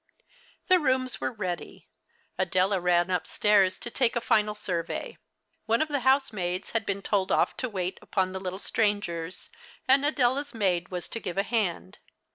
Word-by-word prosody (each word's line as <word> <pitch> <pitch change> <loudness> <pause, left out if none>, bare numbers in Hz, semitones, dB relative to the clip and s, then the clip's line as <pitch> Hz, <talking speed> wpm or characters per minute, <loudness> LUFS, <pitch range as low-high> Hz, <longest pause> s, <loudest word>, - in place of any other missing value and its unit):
The 370 -1 +5
rooms 260 -3 0
were - - -1
ready. 185 -7 -5 0.5
Adela 185 +1 +1
ran 175 0 +2
uj^stairs 190 +2 +2
to 240 - -5
take 245 -2 +1
a - - +2
final 210 -2 +2
survey. 170 -4 -4 0.5
One 230 +1 +3
of 310 - 0
the 285 -1 0
housemaids 225 -9 0
had 225 -1 -1
been 200 0 -2
told 195 -3 0
off - - +2
to 255 - -2
wait 185 -3 -3
U23on 185 -2 -1
the 190 - -4
little 185 0 -4
strangers; 190 -5 -1 0.4
and 270 +2 +5
Adela's 280 -1 +1
maid 180 -5 0
was 180 -2 -5
to 230 - -5
give 180 -4 -5
a 195 - +3
hand. 190 - -2
205 Hz, 165 wpm, -27 LUFS, 185-240 Hz, 0.5 s, The